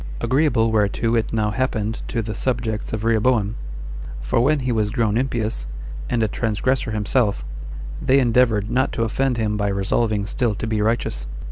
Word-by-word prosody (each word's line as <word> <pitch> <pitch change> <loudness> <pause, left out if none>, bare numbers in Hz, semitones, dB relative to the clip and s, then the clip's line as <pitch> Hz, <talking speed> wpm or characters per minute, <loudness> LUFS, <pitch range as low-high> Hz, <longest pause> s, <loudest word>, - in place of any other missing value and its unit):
Agreeable 120 -2 +2
whereto 110 +2 +1
it 115 - 0
now 110 -2 +1
happened 110 -3 -1
to 115 -2 -1
the 110 0 -4
subjects 115 -2 -2
of 110 -1 -3
Rehoboam; 115 -1 +2 0.6
for - - 0
when 145 +3 +3
he 125 -1 -1
was 110 -3 +1
grown 110 -2 +1
impious, 115 - -1 0.4
and 120 -2 +1
a - - +3
transgressor 115 +4 0
himself, 105 0 +1 0.6
they 130 - +4
endeavored 115 -4 +3
not 130 +2 +2
to 115 - 0
offend 125 +2 0
him 105 -2 0
by 100 -1 0
resolving 100 +2 +1
still 110 +1 0
to 115 - -4
be 110 -1 0
righteous. 105 - 0
115 Hz, 165 wpm, -22 LUFS, 105-125 Hz, 0.6 s, they